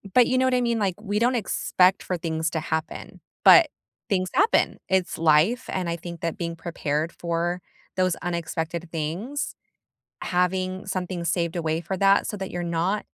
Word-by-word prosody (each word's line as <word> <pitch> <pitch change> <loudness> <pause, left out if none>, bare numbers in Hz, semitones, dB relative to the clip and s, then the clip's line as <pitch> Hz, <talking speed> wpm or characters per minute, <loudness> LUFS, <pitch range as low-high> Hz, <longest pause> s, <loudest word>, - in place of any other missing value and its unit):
But, 250 - +7
you 255 - +1
know 260 - +3
what 255 - +2
I 250 - +2
mean? 235 -2 +1
Like, 190 -4 0
we 210 0 -1
don't 245 +2 +2
expect 190 -3 +2
for 180 - -2
things 160 -1 -2
to 160 - -1
happen, 160 +1 -4 0.2
but - - +9 0.4
things 185 -2 +1
happen! 425 +4 +3
It's 190 -1 +1
life, 165 +11 +3
and, 185 -2 -2
I 170 - -2
think 170 0 -8
that 165 -1 -2
being 170 -2 -3
prepared 165 -2 -2
for 175 +1 -2 0.4
those 185 -2 +2
unexpected 170 -1 -3
things, 175 - -3 0.7
having 185 +1 0
something 180 -2 -3
saved 170 0 0
away 160 -1 -1
for 190 - -3
that 195 +1 +4
so 210 - -3
that 190 0 -5
you're 175 0 -3
not 170 +5 -1
175 Hz, 175 wpm, -25 LUFS, 165-195 Hz, 0.7 s, but